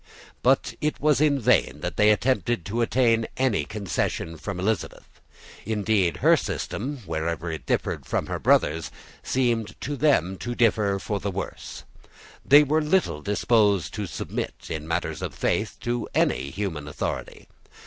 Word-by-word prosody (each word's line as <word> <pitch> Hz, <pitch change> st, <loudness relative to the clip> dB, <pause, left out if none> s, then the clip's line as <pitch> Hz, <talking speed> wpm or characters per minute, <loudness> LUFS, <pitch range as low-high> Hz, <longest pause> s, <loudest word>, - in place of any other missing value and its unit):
But -, -, +2 dB
it 150 Hz, 0 st, -1 dB
was 150 Hz, -2 st, +3 dB
in 145 Hz, -2 st, +3 dB
vain 75 Hz, -, +2 dB
that 90 Hz, -, -3 dB
they 105 Hz, 0 st, +5 dB
attempted 120 Hz, -3 st, +1 dB
to 115 Hz, +4 st, -2 dB
obtain 115 Hz, -1 st, +2 dB
any 130 Hz, -5 st, +1 dB
concession 95 Hz, -5 st, -3 dB
from 95 Hz, +3 st, -5 dB
Elizabeth. 105 Hz, +3 st, -2 dB, 0.6 s
Indeed 105 Hz, -4 st, +1 dB
her -, -, +8 dB
system, 130 Hz, +2 st, -4 dB
wherever 85 Hz, 0 st, -2 dB
it 80 Hz, -, -7 dB
differed -, -, -1 dB
from -, -, -1 dB
her -, -, -4 dB
brother's, 80 Hz, +2 st, +2 dB, 0.3 s
seemed 120 Hz, -4 st, -1 dB
to 145 Hz, +2 st, -3 dB
them 120 Hz, -, +2 dB
to 120 Hz, 0 st, -4 dB
differ 105 Hz, -4 st, +2 dB
for 100 Hz, +1 st, -3 dB
the 100 Hz, -, -3 dB
worse. 100 Hz, +1 st, -6 dB, 0.6 s
They 145 Hz, +2 st, +7 dB
were 155 Hz, +2 st, +1 dB
little 150 Hz, -, +1 dB
disposed 105 Hz, 0 st, +2 dB
to 105 Hz, -3 st, -3 dB
submit, -, -, -4 dB, 0.2 s
in 80 Hz, -1 st, -4 dB
matters 80 Hz, -, -2 dB
of -, -, -4 dB
faith, -, -, -1 dB
to 120 Hz, -1 st, -2 dB
any 70 Hz, +2 st, +1 dB
human 85 Hz, -5 st, -4 dB
authority. -, -, -5 dB
105 Hz, 150 wpm, -25 LUFS, 90-125 Hz, 0.6 s, her